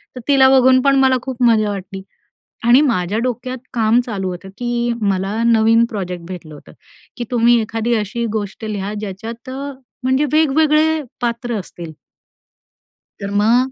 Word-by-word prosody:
तर 250 - -7
तिला 270 -2 +5
बघून 255 0 +5
पण 275 0 +3
मला 260 -1 +4
खूप 255 -2 -4
मजा 220 -3 +3
वाटली. 195 0 -7 0.7
आणि 250 +4 +7
माझ्या 210 - 0
डोक्यात 255 +1 -3 0.2
काम 225 0 +3
चालू 195 -5 -3
होतं, 180 +2 -8
की 240 -1 -1
मला 200 +2 -1
नवीन 230 0 +4
प्रोजेक्ट 180 -5 -5
भेटलं 175 -4 -9
होतं, - - -15 0.5
की 240 - -3
तुम्ही 240 0 +4
एखादी 225 +2 -2
अशी 215 +2 -2
गोष्ट 205 +2 -6
लिहा 205 -1 -4
ज्याच्यात 225 +5 -7
अ 280 +2 -5 0.3
म्हणजे 260 +3 +2
वेग-वेगळे 310 +1 +3 0.2
पात्र 235 0 -2
असतील. 170 -3 -9 1.3
तर 200 0 -5
मग 245 +4 +3
235 Hz, 150 wpm, -18 LUFS, 200-255 Hz, 1.3 s, आणि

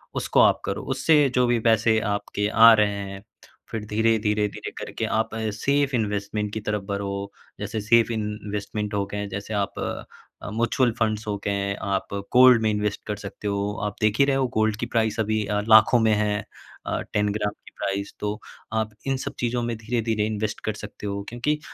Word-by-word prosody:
उसको - - +1
आप - - +4
करो 100 - -2
उससे 145 +4 +4 0.2
जो 125 0 +4
भी 120 -1 +2
पैसे 110 0 +4
आपके 105 0 -2
आ 115 +2 +8
रहे 105 -1 +4 0.2
हैं। 100 0 -9 0.5
फिर 110 -2 -4
धीरे-धीरे 105 -1 +1
धीरे - - -7
करके - - -4
आप 110 +1 0 0.3
सेफ 140 +4 +1
इन्वेस्टमेंट 105 -1 -2
की 110 - -2
तरफ 105 0 -2
बढ़ो, 100 0 -3 0.3
जैसे 110 - -3
सेफ 115 +2 +4
इन्वेस्टमेंट 105 -1 -4
हो 100 -1 0
गए 105 0 -3
जैसे 100 +2 -5
आप 100 -1 -2
अ, - - -7
म्यूचुअल 120 +2 +2
फंड्स 110 -1 0
हो 105 -1 -1
गए, 100 0 0
आप 100 -1 -3
अ, 100 - -1
गोल्ड 125 -2 +7
में 110 - +2
इन्वेस्ट 105 0 -2
कर 105 - -2
सकते 105 +1 -6
हो, 100 0 -1
आप 105 0 -3
देख 105 0 +2
ही 140 - +7
रहे 140 -1 +2
हो 135 -1 +1
गोल्ड 110 -1 +2
की - - -1
प्राइस 110 0 +1
अभी 110 -1 0
अ, 105 +1 0
लाखों 110 +2 +7
में 110 -1 +3
है। 105 -1 0 0.4
अ, - - -1
10 105 0 +2
ग्राम 105 -1 -1
की - - -12
प्राइस 100 0 -2
तो 105 0 -3 0.3
आप 110 -1 0 0.2
इन 135 0 +1
सब - - -5
चीजों 120 0 0
में 120 0 -2
धीरे-धीरे 110 -1 -1
इन्वेस्ट 110 -1 -3
कर 110 - 0
सकते 105 0 -8
हो 100 0 -3
क्योंकि 135 +6 -1
105 Hz, 195 wpm, -24 LUFS, 105-115 Hz, 0.5 s, आ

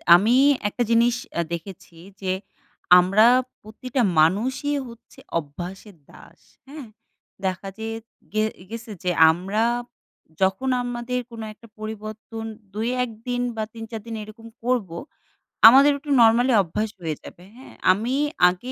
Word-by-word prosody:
আমি 215 +7 +3 0.3
একটা 240 +4 -1
জিনিস 235 +1 +4 0.2
অ্যা 170 - 0
দেখেছি 170 -1 -8 0.2
যে, 185 -1 -1 0.7
আমরা 195 +5 +4 0.4
প্রতিটা 250 +4 -4 0.2
মানুষই 245 - +1
হচ্ছে 230 0 -15 0.2
অভ্যাসের 175 +6 -9
দাস। - - -17 0.3
হ্যাঁ? 280 -3 -9 0.6
দেখা 185 +1 -2
যে 220 - -4 0.5
গে 215 0 +2 0.3
গেছে 230 0 -8
যে, 180 - +1 0.2
আমরা 195 +6 -1 0.8
যখন 190 +8 +1
আমাদের 245 +1 -3
কোনো 225 -1 -7
একটা 230 - -18
পরিবর্তন 215 +1 -7 0.3
২ 220 +3 -2 0.2
১ 250 - -4 0.2
দিন 245 0 -1
বা, 220 - -2
৩ 225 -1 -8
৪ 225 -1 -5
দিন 225 - -5
এরকম 220 +2 -12 0.2
করবো। 230 -9 -1 0.7
আমাদের 275 +5 +8
একটু 285 +1 -12
নরমালি 235 +3 +5
অভ্যাস 210 +5 -3
হয়ে 160 -3 -3
যাবে। 175 - -13
হ্যাঁ? 260 - -14 0.2
আমি 225 +8 -1 0.3
আগে 215 +9 -6
220 Hz, 135 wpm, -23 LUFS, 190-245 Hz, 0.8 s, আমাদের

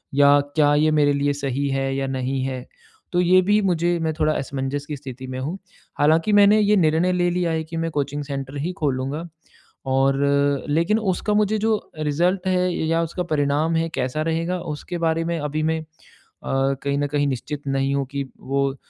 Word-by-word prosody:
या 145 0 +6 0.2
क्या 145 -1 +4
ये 155 +1 +3
मेरे 145 -1 +3
लिए 140 0 +1
सही 140 0 -2
है 135 0 -1
या 135 0 -1
नहीं 130 0 -2
है? 130 -1 -4 0.5
तो 175 - +1
ये 185 +1 +5
भी 205 +3 +3
मुझे 175 -2 +1
मैं 160 -1 0
थोड़ा 155 0 +2
असमंजस 140 +1 -3
की 150 - -5
स्थिति 130 -2 -8
में 130 0 -5
हूँ। 155 +9 -3 0.4
हालाँकि 160 +7 +3
मैंने 205 +1 +6
ये 210 0 +4
निर्णय 165 +2 +3
ले 175 -1 +2
लिया 175 -1 0
है 160 0 -1
कि 165 +1 -7
मैं 165 0 -2
कोचिंग 145 0 -2
सेंटर 135 0 -5
ही 175 +4 -2
खोलूँगा 140 +3 -2 0.7
और 135 +1 +3 0.5
लेकिन 170 +9 +2
उसका 210 +1 -1
मुझे 210 +1 +2
जो 220 +1 +2 0.2
रिज़ल्ट 175 +6 0
है 180 -1 +2
या 165 +1 0
उसका 170 +2 -3
परिणाम 155 0 0
है, 165 0 0
कैसा 130 +1 -2
रहेगा, 165 +3 -1
उसके 170 +2 -5
बारे 165 -1 0
में 170 0 -1
अभी 150 +1 -2
मैं 160 0 0
अ, - - -9 0.6
कहीं 135 +1 0
न 145 0 0
कहीं 145 0 0
निश्चित 140 +2 -4
नहीं 135 0 0
हूँ 140 -1 0
कि 140 0 -2 0.2
वो 135 0 -1
155 Hz, 195 wpm, -22 LUFS, 140-170 Hz, 0.7 s, या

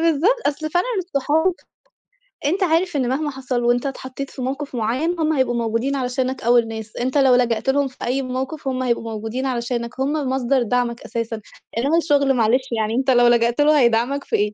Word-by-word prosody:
بالضبط، 335 - +3
أصل 310 +2 -2
فعلًا 355 +6 +1
الصحاب، 320 0 +1 0.9
أنت 365 +7 +1
عارف 345 0 +1
إن 255 -4 +1
مهما 295 +4 -1
حصل 260 -2 -3
وأنت 240 +1 +2
اتحطيت 270 0 -5
في - - -9
موقف 275 +2 -4
معيّن 260 +10 -1
هم 315 0 +2
هيبقوا 260 -4 +1
موجودين 230 +4 -1
علشانك 255 0 -2
أول 235 0 +4
ناس. 220 -1 -7
أنت 255 +4 -1
لو 265 -3 +5
لجأت 240 0 +1
لهم 280 +1 +2
في 260 - -14
أي 255 +3 0
موقف، 265 +3 -4
هم 260 -1 -1
هيبقوا 235 -2 -1
موجودين 225 +4 -4
علشانك. 240 -1 -3
هم 270 +2 +1 0.2
مصدر 260 0 +1
دعمك 240 0 -1
أساسًا، 230 -1 -4 0.4
إنما 280 +8 +2
الشغل 285 -5 +3
معلش 250 +2 +1
يعني 220 -1 -1
أنت 265 +1 +2
لو 245 -1 +5
لجأت 235 +2 +3
له 300 0 +5
هيدعمك 245 +3 +2
في - - -2
إيه؟ 210 0 0
260 Hz, 190 wpm, -21 LUFS, 235-280 Hz, 0.9 s, لو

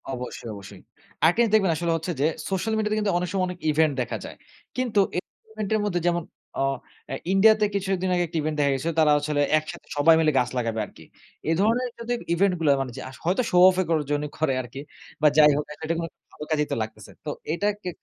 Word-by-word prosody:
অবশ্যই, 125 -2 -6
অবশ্যই। 100 -1 -11 0.5
একটা 175 - +2
জিনিস 230 -3 +2
দেখবেন 195 -5 +4
আসলে 170 +2 -1
হচ্ছে 165 +3 -4
যে, - - +3 0.2
সোশ্যাল 195 +3 -1
মিডিয়াতে 215 0 0
কিন্তু 210 -3 0
অনেক 180 0 -2
সময় 190 -2 +1
অনেক 180 0 -6
ইভেন্ট 155 0 +3
দেখা 120 - -3
যায়। - - -9 0.4
কিন্তু 245 -5 +1 0.2
এ - - +3 0.3
ইভেন্টের 215 0 -1
মধ্যে 175 -4 -1
যেমন 175 -1 +1 0.4
আ - - +3 0.4
অ্যা 135 - -4 0.2
ইন্ডিয়াতে 215 +2 +5
কিছু 195 -1 -1
একদিন 185 0 -2
আগে 175 - +2
একটি 165 - -4
ইভেন্ট 155 +1 -2
দেখা 140 -1 +3
গিয়েছিল। 150 +5 -1
তারা 155 -1 +5
হচ্ছে 145 +1 -1
হলো 145 -1 +1 0.2
একসাথে 155 +1 -6
সবাই 160 +3 +6
মিলে 155 -1 +3
গাছ 125 - 0
লাগাবে 115 -2 -1
আরকি। - - -16 0.5
এ - - +3
ধরনের 240 +4 +2
যদি 235 +1 -2 0.2
ইভেন্ট 190 +2 +3
গুলো, 160 -3 +2
মানে 130 -2 -4 0.2
আস 130 - -12
হয়তো 180 +8 +2
শো 180 - +3
অফ 185 - 0
এর - - -1
কর 165 - +3
জন্য 145 0 0
করে 155 -4 +1
আরকি 125 +2 -8 0.4
বা 155 - +6
যাই 150 -1 +8
হোক 150 - -2
অ্যাটলিস্ট 165 +2 -4 0.2
ভালো 150 - -8
কাজেই 150 -2 +1
তো - - +1
লাগতেছে। 110 -1 -10
তো - - -3 0.2
এটা 170 +5 0 0.2
কে 180 - -3
165 Hz, 225 wpm, -25 LUFS, 150-195 Hz, 0.5 s, যাই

